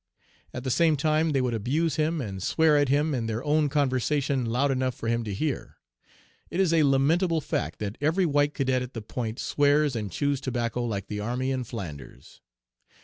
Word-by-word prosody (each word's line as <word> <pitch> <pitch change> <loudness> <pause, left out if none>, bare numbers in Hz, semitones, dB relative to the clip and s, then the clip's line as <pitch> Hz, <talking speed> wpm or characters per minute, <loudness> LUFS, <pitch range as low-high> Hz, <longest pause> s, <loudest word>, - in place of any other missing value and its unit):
At 125 - -6
the 130 - -1
same 160 +2 +3
time 155 +2 +2
they 140 -3 +1
would 125 -2 0
abuse 140 +8 0
him 155 0 0
and 95 -6 -5
swear 160 - +3
at 145 -2 +3
him 145 +2 +2
in 120 -4 -2
their 115 +2 -3
own 150 0 +2
conversation 135 -2 0
loud 130 +5 +1
enough 130 -1 -1
for 115 - -6
him 115 0 0
to 105 - -4
hear. 135 +7 -3 0.7
It 180 - -3
is 185 -4 +3
a 165 - +4
lamentable 160 +5 +3
fact - - -3
that 105 0 -5
every 160 +6 +2
white 145 -1 +1
cadet 130 -2 +1
at 125 0 -7
the 115 - -5
Point 115 +1 -4
swears 145 -1 +2
and 105 -4 -3
chews 140 +6 -1
tobacco 120 -2 -2
like 100 -4 -3
the 105 +1 -5
army 125 +5 -2
in 130 -2 -2
Flanders. 75 - -9
135 Hz, 200 wpm, -26 LUFS, 115-150 Hz, 0.7 s, a